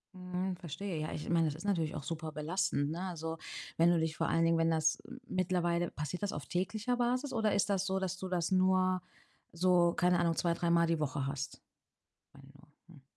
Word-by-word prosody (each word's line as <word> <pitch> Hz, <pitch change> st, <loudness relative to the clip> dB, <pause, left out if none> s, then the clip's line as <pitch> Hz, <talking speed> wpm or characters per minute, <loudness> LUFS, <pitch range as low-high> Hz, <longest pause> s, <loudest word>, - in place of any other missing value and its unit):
Mhm, 180 Hz, 0 st, -3 dB
verstehe, 175 Hz, +1 st, -5 dB
ja. 155 Hz, -, -3 dB
Ich 150 Hz, -, -5 dB
meine, 165 Hz, -1 st, +3 dB
das 150 Hz, -, -2 dB
ist 170 Hz, -, -9 dB
natürlich 165 Hz, -6 st, 0 dB
auch 145 Hz, -, -5 dB
super 160 Hz, 0 st, -4 dB
belastend, 155 Hz, -1 st, 0 dB
ne? 170 Hz, +3 st, -4 dB
Also, 165 Hz, -3 st, -4 dB, 0.4 s
wenn 170 Hz, +1 st, +5 dB
du 170 Hz, -, +3 dB
dich 160 Hz, -1 st, -1 dB
vor -, -, 0 dB
allen 165 Hz, 0 st, +3 dB
Dingen, 165 Hz, 0 st, +3 dB
wenn 165 Hz, 0 st, +3 dB
das 160 Hz, 0 st, +2 dB
m 250 Hz, +2 st, -10 dB
mittlerweile 175 Hz, -2 st, 0 dB
passiert 150 Hz, +7 st, -4 dB
das 200 Hz, -, 0 dB
auf 145 Hz, -, -5 dB
täglicher 215 Hz, +8 st, -1 dB
Basis 255 Hz, +3 st, 0 dB
oder 220 Hz, -2 st, +2 dB
ist 200 Hz, +1 st, +2 dB
das 195 Hz, -1 st, +1 dB
so, 190 Hz, 0 st, 0 dB
dass 190 Hz, -1 st, -2 dB
du 185 Hz, 0 st, -5 dB
das 175 Hz, -1 st, 0 dB
nur 185 Hz, 0 st, +3 dB, 0.5 s
so, 175 Hz, 0 st, +3 dB
keine 180 Hz, 0 st, +3 dB
Ahnung, 165 Hz, -1 st, +2 dB
zwei, 170 Hz, -1 st, +2 dB
dreimal 170 Hz, 0 st, +2 dB
die 165 Hz, -2 st, +1 dB
Woche 140 Hz, -2 st, -1 dB
hast? 140 Hz, 0 st, -5 dB, 0.7 s
Meine 135 Hz, -1 st, -16 dB
nur, 145 Hz, +2 st, -19 dB, 0.3 s
hm. 135 Hz, -, -17 dB
175 Hz, 215 wpm, -33 LUFS, 160-185 Hz, 0.7 s, wenn